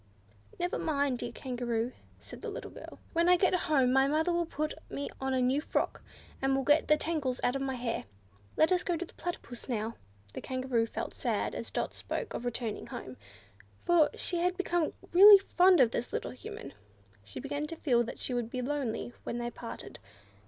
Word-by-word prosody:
"Never 355 0 -1
mind, 280 -5 0
dear 240 - -4
Kangaroo," 240 -2 -2 0.3
said - - -12
the - - -4
little - - -7
girl; - - -10 0.2
"when 340 +1 +3
I 360 - +7
get 370 +1 +3
home 275 -8 +3
mother 300 +6 +3
will 340 -1 0
put 305 -1 -2 0.2
me 280 - -4
on 265 0 -1
a 255 - +2
new 260 +4 +2
frock, - - -1 0.4
and 270 0 +2
will 270 - 0
get 295 +3 +4
the 305 - +5
tangles 300 -6 -1
out 245 - +2
of 275 - -1
my 265 -1 -1
hair. 240 -2 -3 0.5
Let 315 - +4
us 365 -1 +4
go 350 -2 0
to 355 - -4
the - - -18
Platypus 270 -9 -6
now." 225 -1 -2 0.4
The - - -5
Kangaroo 255 -3 0
felt - - -5
sad - - -1
as - - -5
Dot - - -2
spoke - - -4
of 245 - -4
returning 235 -2 -3
home, 130 - -7 0.7
for 340 -3 +5
she 355 - -1
had 360 +1 +1
become 350 -4 0 0.2
really 400 +3 +11
fond 370 -2 +4
of 245 -4 +5
the - - 0
little - - -3
Human. 140 - -9 0.5
She 100 -1 -8
began 290 +1 -3
to 330 - -6
feel 250 -7 +2
that 235 - -7
she 255 - -4
would 240 -2 -1
be 250 +1 -3
lonely 255 -4 -2
when 235 - -3
they 240 0 -3
parted. 235 - -8
270 Hz, 200 wpm, -31 LUFS, 245-330 Hz, 0.7 s, really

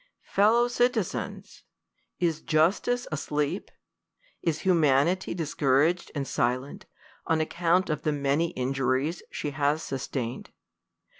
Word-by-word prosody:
Fellow 225 +4 +4
citizens! 245 0 -1 0.6
is 165 -3 0
Justice 190 +10 +1
asleep? 150 +3 -2 0.7
Is 160 -2 -1
Humanity 170 0 +2
dis 160 -4 -3
couraged 150 +6 +2
and 140 -2 -2
silent, 125 +3 -2 0.4
on 160 -1 +2
account 170 +3 +1
of 150 -2 -2
the 155 - 0
many 145 +3 +1
injuries 135 +4 -1
she 150 - -4
has 145 +3 0
sustained 130 -2 -4
155 Hz, 105 wpm, -27 LUFS, 140-175 Hz, 0.7 s, Fellow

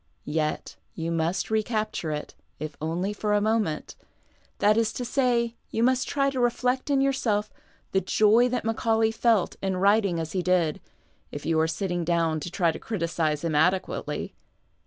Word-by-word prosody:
Yet 155 0 -2 0.2
you 165 0 -3
must 165 +5 -1
recapture 215 -5 -1
it, 150 -1 -4 0.2
if 155 -1 -6
only 175 +6 -1
for 210 0 -1
a - - +4
moment; 215 -7 -1 0.6
that 210 +1 +4
is 225 -1 +2
to 245 - -4
say, 240 -2 +1 0.2
you 225 - 0
must 255 +1 +2
try 275 -1 +1
to 260 - -3
reflect 250 +2 0
in 275 -1 +3
yourself 230 -6 0 0.4
the 190 - +2
joy 215 +6 +4
that 245 -2 -2
Maeaulay 225 0 +1
felt 225 -4 +2
in 195 -1 -1
^vrit 200 +4 +4
ing 175 -4 -1
as 160 -1 -4
he 185 - -1
did, 175 -4 +1 0.5
if 145 - -7
you 160 -1 +2
are 160 - +3
sitting 175 +1 -2
down 165 -2 +1
to 165 - -5
try 170 -2 +1
to - - -8
criticize 165 -6 -1
hira 160 -3 0
adequately. 180 +5 0
200 Hz, 175 wpm, -26 LUFS, 165-230 Hz, 0.6 s, a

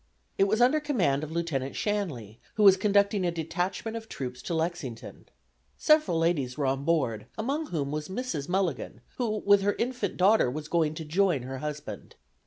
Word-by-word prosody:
It 195 - +6
was 215 +4 +1
under 260 +5 +5
command 190 - 0
of 155 - -5
Lieutenant 160 -6 -2
Shanley, 160 - -3 0.2
who 215 - +2
was 195 -2 +9
conducting 200 0 +2
a 175 - +2
detachment 180 +6 -3
of 220 -1 -7
troops 125 -1 -6
to 170 - -3
Lexington. 160 -8 -4 0.5
Several 305 - +3
ladies 155 -6 0
were 145 - 0
on 135 +1 0
board, 130 -10 0
among 280 +8 -2
whom 145 - -2
was 150 0 -3
Mrs. 190 - -4
Mulligan, 175 - -1 0.2
who 215 -4 -1
with 200 0 +6
her 205 +1 +1
infant 240 -5 -2
daughter 195 - +4
was 150 +4 -5
going 160 -3 +1
to 160 -1 -6
join 170 -3 +1
her 130 +1 -6
husband. 150 0 -6
170 Hz, 180 wpm, -28 LUFS, 145-205 Hz, 0.5 s, was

